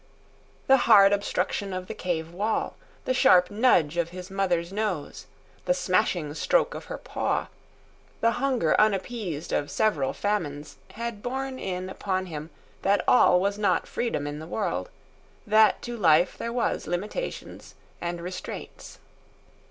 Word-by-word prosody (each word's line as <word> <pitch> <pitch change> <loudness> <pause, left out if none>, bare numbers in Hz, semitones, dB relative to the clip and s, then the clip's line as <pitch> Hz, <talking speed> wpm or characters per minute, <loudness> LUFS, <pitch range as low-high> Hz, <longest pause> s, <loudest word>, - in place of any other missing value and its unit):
The 270 - +6
hard 200 -2 +8
obstruction 200 -1 -1
of 185 0 -4
the - - -6
cave 165 -2 -3
wall, 210 +5 -1 0.3
the 255 - +1
sharp 180 -7 +5
nudge 190 - +3
of 170 -1 0
his 180 +1 -9
mother's 180 -2 -1
nose, 200 -8 -3 0.4
the - - +2
smashing 155 - 0
stroke - - +1
of - - -8
her - - -6
paw, - - -2 0.7
the 230 - +3
hunger 255 - +2
unappeased 200 -5 -1
of 145 - -1
several 160 -12 +1
famines, 150 -8 -3 0.2
had 230 -2 -5
borne 265 +2 -4
in 185 -1 -4
upon 190 0 -2
him 155 -3 -7 0.3
that 200 +1 +2
all 180 -7 +6
was 200 +2 -1
not 205 - +1
freedom 230 -12 -2
in 145 +1 -5
the 160 - -8
world, 170 - -2 0.6
that 215 -1 +4
to 240 0 -5
life 175 -4 +4
there 235 - -4
was 240 -9 -1
limitations 205 - -5 0.3
and 175 0 -3
restraints. 180 +1 -8
190 Hz, 145 wpm, -26 LUFS, 170-215 Hz, 0.7 s, hard